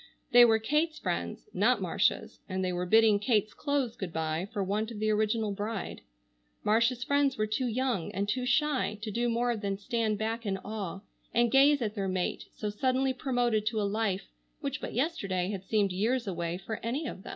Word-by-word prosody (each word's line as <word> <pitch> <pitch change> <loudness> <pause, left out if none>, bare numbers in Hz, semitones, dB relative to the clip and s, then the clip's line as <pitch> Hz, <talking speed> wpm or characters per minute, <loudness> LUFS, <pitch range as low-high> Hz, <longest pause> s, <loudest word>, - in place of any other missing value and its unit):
They 245 0 +9
were 225 -1 +5
Kate's 300 +8 0
friends, - - -3
not - - +3
Marcia's, - - 0
and 190 0 -1
they 180 - -1
were 180 0 -2
bidding 220 0 +5
Kate's 215 -1 +1
clothes 285 -5 -1
good 190 -4 -5
bye 160 +2 -2
for 205 -3 -1
want 210 +3 -1
of 230 - -7
the 215 +1 +1
original 215 0 +1
bride. 205 +1 -4 0.6
Marcia's 230 +3 +2
friends 285 0 +2
were 215 - +1
too 215 +4 -1
young 240 -6 -1
and 200 +2 -2
too 250 +4 -1
shy 285 -7 +1
to 215 - -3
do 240 +3 0
more 240 +1 +1
than 200 -2 -3
stand 215 +1 -1
back 225 +2 -2
in 195 -3 -1
awe 195 -3 -5 0.3
and 235 0 +3
gaze 280 0 +5
at 210 -2 -2
their 200 -3 -2
mate 185 -1 -2
so 210 -1 -3
suddenly 260 +4 +1
promoted 245 -5 0
to 220 0 0
a - - +1
life 200 -1 -1 0.3
which - - -4
but - - -5
yesterday 200 - -1
had 195 -2 -5
seemed 205 -2 +1
years 230 +7 0
away 170 -3 -3
for 210 +4 -5
any 260 +8 -2
of 190 - -6
them. - - -10
220 Hz, 200 wpm, -30 LUFS, 200-245 Hz, 0.6 s, They